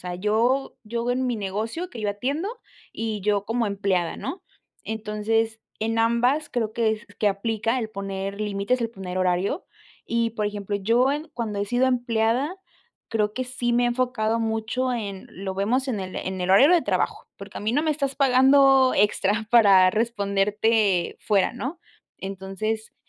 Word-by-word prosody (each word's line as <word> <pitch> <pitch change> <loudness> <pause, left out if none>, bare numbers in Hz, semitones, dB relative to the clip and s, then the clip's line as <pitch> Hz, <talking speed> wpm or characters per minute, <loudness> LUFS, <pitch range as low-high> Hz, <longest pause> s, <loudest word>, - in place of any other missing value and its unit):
sea, 180 0 -4
yo 225 +8 +1
yo 235 +2 -2
en 255 +1 0
mi 245 - -1
negocio 220 - -3
que 230 - -8
yo 210 - -1
atiendo 275 - -2 0.4
y 220 -2 -3
yo 205 0 +1
como 230 +1 0
empleada, 195 -4 -1
¿no? 275 - -6 0.4
Entonces, 220 +1 -1 0.2
en 225 +1 0
ambas 240 +6 +2
creo 225 -4 -1
que 225 -1 +1
es 220 +2 -7
que 210 - +1
aplica 225 +4 -1
el 220 -2 -4
poner 195 0 -5
límites, 210 +4 -1
el 230 -1 -1
poner 185 -4 -6
horario. 185 - 0 0.5
Y, 230 0 +1
por 215 -2 -2
ejemplo, 205 -1 -4
yo 235 +7 +2
en 300 +2 -4
cuando 220 -4 -3
he 200 - -1
sido 245 +4 +2
empleada, 245 - +1 0.5
creo 210 -2 0
que 255 - -2
sí 250 -1 -2
me 245 - +3
he - - +3
enfocado 240 -2 0
mucho 225 +3 -1
en: 200 -5 -5
"Lo 190 +1 -5
vemos 235 +8 0
en 235 -7 -2
el 185 -1 -6
en 190 0 -4
el 180 - -2
horario 265 - +7
de 345 - +4
trabajo", - - -1
porque - - -9
a - - -8
mí 215 +2 -1
no 290 +4 +2
me 315 - +1
estás 280 -2 -1
pagando 270 0 +5
extra 210 +1 +2
para 195 -6 +7
responderte 205 -2 +1
fuera, 200 -3 +2
¿no? 265 +7 -5 0.4
Entonces, 195 +3 -4
220 Hz, 175 wpm, -24 LUFS, 200-245 Hz, 0.5 s, horario